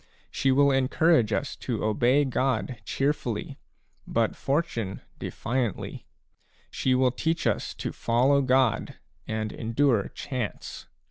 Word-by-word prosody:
She 135 Hz, -, +1 dB
will 140 Hz, +1 st, +5 dB
en 135 Hz, -1 st, +2 dB
courage 155 Hz, -7 st, +3 dB
us 130 Hz, +5 st, -1 dB
to 120 Hz, -4 st, -3 dB
obey 120 Hz, +7 st, +3 dB
God 130 Hz, -2 st, -1 dB
cheerfully, 135 Hz, -6 st, -2 dB, 0.5 s
but -, -, +1 dB
Fortune 120 Hz, -, -2 dB, 0.2 s
defiantly; 120 Hz, -4 st, -3 dB, 0.6 s
she 130 Hz, -1 st, +1 dB
will 130 Hz, 0 st, +3 dB
teach 160 Hz, +6 st, -1 dB
us -, -, 0 dB
to -, -, -4 dB
follow 130 Hz, +5 st, +2 dB
God 130 Hz, -3 st, +2 dB, 0.3 s
and 110 Hz, -1 st, -2 dB
endure 115 Hz, -1 st, +1 dB
Chance. 125 Hz, -6 st, -5 dB
130 Hz, 120 wpm, -27 LUFS, 115-140 Hz, 0.6 s, will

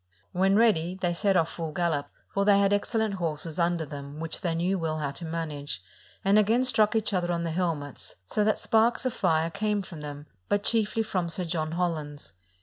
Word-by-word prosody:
When 190 Hz, +2 st, +3 dB
ready, 185 Hz, -6 st, +3 dB
they 175 Hz, -2 st, 0 dB
set 195 Hz, +2 st, +2 dB
of! 165 Hz, -, +3 dB
full 165 Hz, -1 st, -4 dB
gallop, 160 Hz, -4 st, 0 dB, 0.2 s
for 200 Hz, -, +2 dB
they 200 Hz, 0 st, +5 dB
had 200 Hz, 0 st, +3 dB
excellent 220 Hz, +1 st, 0 dB
horses 165 Hz, -2 st, -3 dB
under 170 Hz, -1 st, +1 dB
them, 145 Hz, 0 st, -8 dB
which 165 Hz, 0 st, -3 dB
they 180 Hz, -, 0 dB, 0.3 s
well 165 Hz, -4 st, -1 dB
knew -, -, -3 dB
how 140 Hz, -, -1 dB
to 155 Hz, +5 st, -7 dB
manage, 155 Hz, -, -4 dB, 0.5 s
and 200 Hz, +2 st, +6 dB
again 225 Hz, +4 st, +3 dB
struck 225 Hz, -3 st, +3 dB
each 215 Hz, -1 st, +1 dB
other 175 Hz, -2 st, +1 dB
on 170 Hz, -1 st, -1 dB
the 165 Hz, -, -2 dB
hel 170 Hz, 0 st, +1 dB
mets, 145 Hz, -1 st, -8 dB
so 210 Hz, -, 0 dB
that 215 Hz, +1 st, +2 dB
sparks 230 Hz, +3 st, +2 dB
of 255 Hz, -, 0 dB
fire 165 Hz, -2 st, +1 dB
came 210 Hz, +1 st, 0 dB
from 165 Hz, -5 st, -9 dB
them, 145 Hz, 0 st, -7 dB, 0.2 s
but 205 Hz, 0 st, +1 dB
chiefly 225 Hz, 0 st, +1 dB
from 185 Hz, -5 st, -1 dB
Sir 175 Hz, +3 st, -2 dB
John 160 Hz, -2 st, -2 dB
Holland's. 150 Hz, -, -3 dB
175 Hz, 210 wpm, -27 LUFS, 160-205 Hz, 0.5 s, and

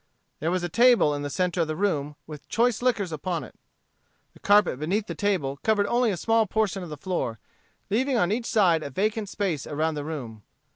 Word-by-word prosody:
There 160 Hz, -, -1 dB
was 180 Hz, 0 st, -1 dB
a -, -, 0 dB
table 235 Hz, -5 st, +4 dB
in 145 Hz, -, -3 dB
the 145 Hz, -, -3 dB
centre 180 Hz, +3 st, 0 dB
of 165 Hz, -, 0 dB
the 155 Hz, -, -3 dB
room, 150 Hz, -6 st, -1 dB
with 150 Hz, -2 st, -11 dB
choice 235 Hz, 0 st, +1 dB
liquors 220 Hz, -8 st, 0 dB
upon 165 Hz, +3 st, -3 dB
it. -, -, -12 dB, 0.8 s
The -, -, -18 dB
carpet 205 Hz, -10 st, +3 dB
beneath 195 Hz, +8 st, -1 dB
the -, -, -5 dB
table 180 Hz, -10 st, -1 dB
covered 215 Hz, -2 st, +2 dB
only 240 Hz, +2 st, +2 dB
a 195 Hz, -, -1 dB
small 225 Hz, +3 st, +2 dB
portion 205 Hz, -1 st, 0 dB
of 175 Hz, -, -7 dB
the 150 Hz, -, -7 dB
floor, 145 Hz, -9 st, -3 dB, 0.5 s
leaving 255 Hz, +4 st, +1 dB
on 180 Hz, -4 st, +2 dB
each 230 Hz, +2 st, -1 dB
side 180 Hz, -7 st, +3 dB
a 145 Hz, -, -5 dB
vacant 210 Hz, -, -1 dB
space 185 Hz, -10 st, -2 dB
around 155 Hz, +2 st, -1 dB
the 145 Hz, -1 st, -4 dB
room. 130 Hz, -9 st, -6 dB
185 Hz, 210 wpm, -26 LUFS, 155-215 Hz, 0.8 s, table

